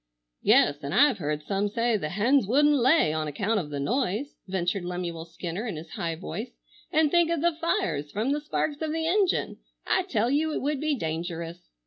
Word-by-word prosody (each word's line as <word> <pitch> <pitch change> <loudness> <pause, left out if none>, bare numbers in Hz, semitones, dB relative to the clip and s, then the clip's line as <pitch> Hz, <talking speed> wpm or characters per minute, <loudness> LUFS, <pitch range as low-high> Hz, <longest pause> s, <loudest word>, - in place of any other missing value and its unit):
"Yes, 145 0 +4
an' 140 - -4
I've 285 -7 +4
heard 150 -1 -2
some 200 +4 -1
say 230 +2 +1
the 155 -7 -2
hens 215 - +2
wouldn't 295 +6 +4
lay, 260 - +4
on 155 -1 -2
account 205 +9 0
of 155 -6 -5
the 145 -1 -4
noise," 245 - -1
ventured 185 0 -1
Lemuel 175 -2 -4
Skinner 175 +6 -5
in 205 - -3
his 160 +1 -9
high 165 -1 -3
voice. 215 +8 -6 0.3
"And 310 -1 +3
think 345 -1 +4
of 335 -3 0
the 340 0 +3
fires 150 - -1
from 220 +6 -1
the 295 +1 0
sparks 295 0 -2
of 315 -1 -1
the 320 0 -1
engine. 380 +2 +1 0.3
I - - +2
tell 245 - 0
you 310 +3 +1
it - - -2
would 290 -1 -1
be 305 -1 +1
dangerous." 170 -1 -5
210 Hz, 200 wpm, -27 LUFS, -, 0.3 s, Yes